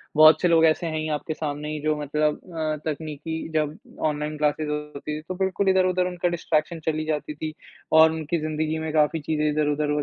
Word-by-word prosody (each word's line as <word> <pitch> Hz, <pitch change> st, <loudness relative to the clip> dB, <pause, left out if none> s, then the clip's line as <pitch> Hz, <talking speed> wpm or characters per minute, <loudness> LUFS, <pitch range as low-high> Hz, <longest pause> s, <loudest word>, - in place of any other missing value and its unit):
बहुत 155 Hz, 0 st, +8 dB
से 180 Hz, -, +4 dB
लोग 165 Hz, -1 st, +5 dB
ऐसे 160 Hz, +2 st, +2 dB
हैं 155 Hz, -1 st, -2 dB
ही 155 Hz, -, -2 dB
आपके 155 Hz, +2 st, -5 dB
सामने 150 Hz, -1 st, -4 dB
ही 155 Hz, -, -3 dB
जो 155 Hz, 0 st, +1 dB
मतलब 150 Hz, +1 st, 0 dB, 0.2 s
अ, 155 Hz, -1 st, -1 dB
तकनीकी 155 Hz, +1 st, -4 dB, 0.2 s
जब 155 Hz, -1 st, 0 dB, 0.3 s
ऑनलाइन 150 Hz, 0 st, -2 dB
क्लासेज़ 150 Hz, 0 st, 0 dB
होती 150 Hz, 0 st, -4 dB
थी, 155 Hz, -, -7 dB
तो 185 Hz, +3 st, -6 dB
बिल्कुल 190 Hz, +1 st, +1 dB
इधर-उधर 185 Hz, -1 st, +3 dB
उनका 180 Hz, -1 st, -1 dB
डिस्ट्रैक्शन 165 Hz, -1 st, -1 dB
चली 155 Hz, -1 st, 0 dB
जाती 150 Hz, -1 st, -2 dB
थी 155 Hz, +1 st, -5 dB, 0.4 s
और 160 Hz, 0 st, +7 dB
उनकी 160 Hz, +1 st, -2 dB
ज़िंदगी 155 Hz, 0 st, -1 dB
में 155 Hz, -, -2 dB
काफ़ी 155 Hz, +1 st, +3 dB
चीज़ें 150 Hz, 0 st, 0 dB
इधर-उधर 150 Hz, 0 st, +1 dB
155 Hz, 200 wpm, -25 LUFS, 150-160 Hz, 0.4 s, बहुत